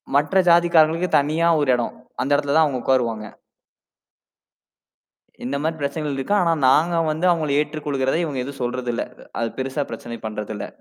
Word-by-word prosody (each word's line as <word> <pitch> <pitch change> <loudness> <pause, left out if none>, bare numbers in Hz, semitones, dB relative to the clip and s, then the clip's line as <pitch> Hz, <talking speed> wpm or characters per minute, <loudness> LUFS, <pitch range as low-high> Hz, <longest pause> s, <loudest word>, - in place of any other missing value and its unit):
மற்ற 150 +6 +1
ஜாதிக்காரங்களுக்கு 170 0 +4
தனியா 160 +4 +1
ஒரு 145 -3 0
இடம். 120 -1 -2 0.3
அந்த 140 - -2
இடத்துல 145 0 0
தான் 160 -1 +6
அவுங்க 130 -4 -2
உக்காருவாங்க. 115 -5 0 2.2
இந்தமாரி 140 +5 -2
பிரச்சனைகள் 145 0 -3
இருக்கு. 135 +10 -1
ஆனா, 170 -1 +2 0.2
நாங்க 165 +6 +3 0.2
வந்து 160 +4 -2
அவுங்கள 155 -5 +1
ஏற்றுக்கொள்கிறத, 145 -2 -2
இவுங்க 135 -5 -3
எதுவும் 135 0 -8
சொல்றது 125 0 -2
இல்ல. - - -1 0.4
அது 115 - 0
பெரிசா 135 +2 -2
பிரச்சனை 115 +1 -7
பண்றது 105 0 -5
இல்ல. - - -5
145 Hz, 150 wpm, -22 LUFS, 130-160 Hz, 2.2 s, தான்